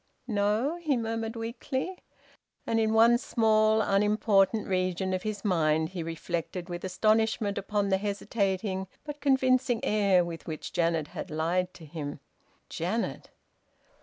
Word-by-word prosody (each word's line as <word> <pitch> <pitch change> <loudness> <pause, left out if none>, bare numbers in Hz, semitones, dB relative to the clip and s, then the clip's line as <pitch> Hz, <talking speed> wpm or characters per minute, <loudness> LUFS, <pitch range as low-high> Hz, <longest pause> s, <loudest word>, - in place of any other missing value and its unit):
"No?" 220 +7 0
he 295 -6 +1
murmured 225 0 -3
weakly. 260 +9 -4 0.7
And 225 - +1
in 220 -1 +2
one 230 +2 +5
small 220 -2 +3
unimportant 210 0 +2
region 185 0 0
of 185 - -1
his 215 0 -4
mind 160 -4 +2
he 185 -2 -5
reflected 170 +2 -4
with 175 0 -5
astonishment 215 +2 +1
upon 205 0 -1
the 190 0 +2
hesitating 200 -1 -1 0.2
but 295 -1 -7
convincing 260 -3 +3
air 200 -4 +3
with 165 -1 -7
which 155 -2 -6
Janet 165 -3 +1
had - - -6
lied 170 +4 0
to 165 - -12
him. 145 -2 -6 0.5
Janet! 190 +8 -3
205 Hz, 135 wpm, -28 LUFS, 180-225 Hz, 0.7 s, one